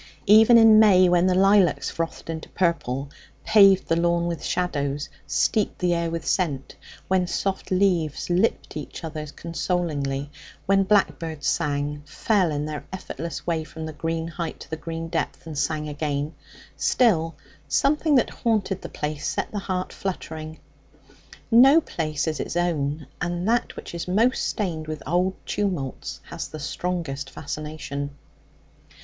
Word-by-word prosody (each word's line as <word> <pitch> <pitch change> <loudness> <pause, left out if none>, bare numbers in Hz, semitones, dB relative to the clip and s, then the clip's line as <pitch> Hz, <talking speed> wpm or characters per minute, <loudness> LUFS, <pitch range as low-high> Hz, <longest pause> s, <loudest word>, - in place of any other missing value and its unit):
Even 220 +3 +8
in 225 -1 +8
May, 190 -4 +6
when 175 +1 +4
the 185 - +3
lilacs 195 -2 +4
frothed 165 0 -4
into 160 -1 -5
purple, 140 -6 -1 0.3
paved 195 -3 +6
the 165 - +2
lawn 170 0 +2
with 170 -1 -3
shadows, 145 -5 -1 0.2
steeped 215 -2 +1
the 180 -1 +1
air 170 -1 0
with 165 0 -4
scent; 145 -8 -1 0.3
when 185 -1 +2
soft 195 +2 -2
leaves 180 -6 +1
lipped 180 +6 0
each 150 +2 -7
other 155 -1 -5
consolingly; 150 -4 -2 0.3
when 195 0 +3
blackbirds 165 -7 +1
sang, 145 -1 0
fell 185 +3 +1
in 145 0 -2
their 150 -1 -5
effortless 170 -3 -6
way 165 -2 0
from 160 +1 -8
the 155 - -6
green 165 +2 -2
height 165 -1 -5
to - - -11
the - - -1
green 165 +1 -5
depth, 165 +1 -3
and 160 -2 -7
sang 150 -1 -1
again 150 0 -2 0.4
still, 165 -10 +2 0.3
something 300 +1 +2
that 255 - +3
haunted 210 -5 -1
the - - -7
place 150 0 -4
set - - -2
the 210 - -3
heart 185 -2 -3
fluttering. 160 -4 -5 0.9
No 265 +7 +8
place 155 - -3
is 155 -1 -2
its - - -3
own, 150 -4 -1 0.2
and 175 +1 -2
that 240 +2 +1
which - - -8
is 170 0 -5
most 225 +8 +2
stained 165 -7 -3
with 155 -1 -5
old 180 +4 +1
tumults 180 -10 -3
has 170 - -5
the 155 - -8
strongest 150 -2 -3
fascination. 145 -1 -6
170 Hz, 150 wpm, -24 LUFS, 155-190 Hz, 0.9 s, Even